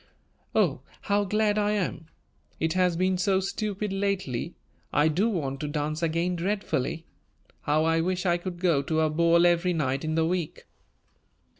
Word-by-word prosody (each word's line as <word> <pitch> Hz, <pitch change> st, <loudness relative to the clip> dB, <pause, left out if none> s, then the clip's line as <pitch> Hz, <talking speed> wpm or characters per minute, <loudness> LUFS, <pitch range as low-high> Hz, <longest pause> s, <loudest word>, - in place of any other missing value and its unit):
"Oh, -, -, +2 dB, 0.2 s
how 205 Hz, 0 st, +1 dB
glad 210 Hz, +1 st, +1 dB
I 210 Hz, 0 st, +1 dB
am! 180 Hz, -5 st, -2 dB, 0.5 s
It 160 Hz, 0 st, 0 dB
has 180 Hz, -2 st, +2 dB
been 185 Hz, 0 st, +1 dB
so 190 Hz, 0 st, +2 dB
stupid 205 Hz, +1 st, -3 dB
lately. 195 Hz, -10 st, -2 dB, 0.4 s
I 150 Hz, +1 st, +3 dB
do 190 Hz, +9 st, +1 dB
want 140 Hz, -9 st, -2 dB
to 150 Hz, -, -3 dB
dance 150 Hz, +1 st, -2 dB
again 170 Hz, +2 st, 0 dB
dreadfully. 170 Hz, -4 st, -2 dB, 0.6 s
How 150 Hz, +2 st, +1 dB
I 165 Hz, 0 st, +2 dB
wish 180 Hz, +2 st, -1 dB
I 175 Hz, -1 st, +3 dB
could 175 Hz, 0 st, -6 dB
go 170 Hz, -6 st, +2 dB
to 160 Hz, +3 st, 0 dB
a 155 Hz, -1 st, +2 dB
ball 170 Hz, +2 st, +4 dB
every 175 Hz, +1 st, +3 dB
night 140 Hz, -3 st, -1 dB
in 155 Hz, 0 st, -1 dB
the 160 Hz, 0 st, +2 dB
week!" 175 Hz, -2 st, -3 dB
175 Hz, 165 wpm, -27 LUFS, 155-190 Hz, 0.6 s, ball